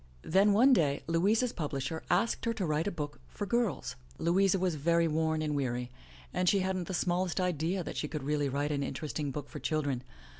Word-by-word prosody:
Then 195 +5 +4
one 250 +7 +6
day 145 - +2
Louisa's 205 +9 +2
publisher 145 0 -3
asked 195 +7 +1
her 230 0 0
to 200 -4 -1
write 155 +2 0
a - - 0
book 150 -4 -5
for 205 - -5
girls. 235 - -1 0.2
Louisa 190 +3 +3
was 185 -2 0
very 170 +3 +2
worn 160 0 0
and 150 -1 -1
weary, 125 -3 -2 0.4
and 180 - +2
she 200 - +3
hadn't 185 -2 -1
the 190 - -2
small 180 +1 +1
est 180 - -3
idea 180 +1 0
that - - -6
she 150 - -1
could 150 -2 -5
really 145 0 0
write 145 +2 -1
an 145 -1 0
interesting 150 +1 -3
book 145 +1 -5
for - - -8
children. 145 -5 -1
165 Hz, 210 wpm, -31 LUFS, 145-190 Hz, 0.4 s, one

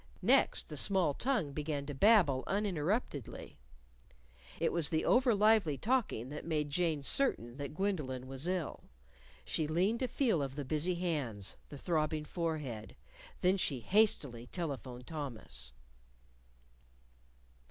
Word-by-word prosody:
Next, - - +3
the - - -6
small 185 -7 +4
tongue 230 - -1
began 150 -1 -3
to 145 - -5
babble 160 - +4
uninterruptedly. 195 - -2 1.0
It - - +1
was 170 -3 +3
the 160 - 0
overlively 215 - +3
talking 220 - 0
that 150 +1 -6
made 150 -3 -2
Jane 160 -2 0
certain 125 - +3
that 145 +1 -6
Gwendolyn 150 -10 -2
was 135 +4 -2
ill. 180 -4 -3 0.6
She 155 - -1
leaned 185 +9 +1
to 255 - 0
feel 235 - +1
of 135 -1 -4
the 145 -1 -4
busy 155 +6 0
hands, 140 - -3
the 145 - -8
throbbing 155 -1 -1
forehead. 150 -11 -4 0.5
Then 185 +1 +3
she 140 -9 -1
hastily 140 - +1
telephoned 130 -6 -5
Thomas. 140 -8 -5
155 Hz, 125 wpm, -33 LUFS, 140-190 Hz, 1.0 s, small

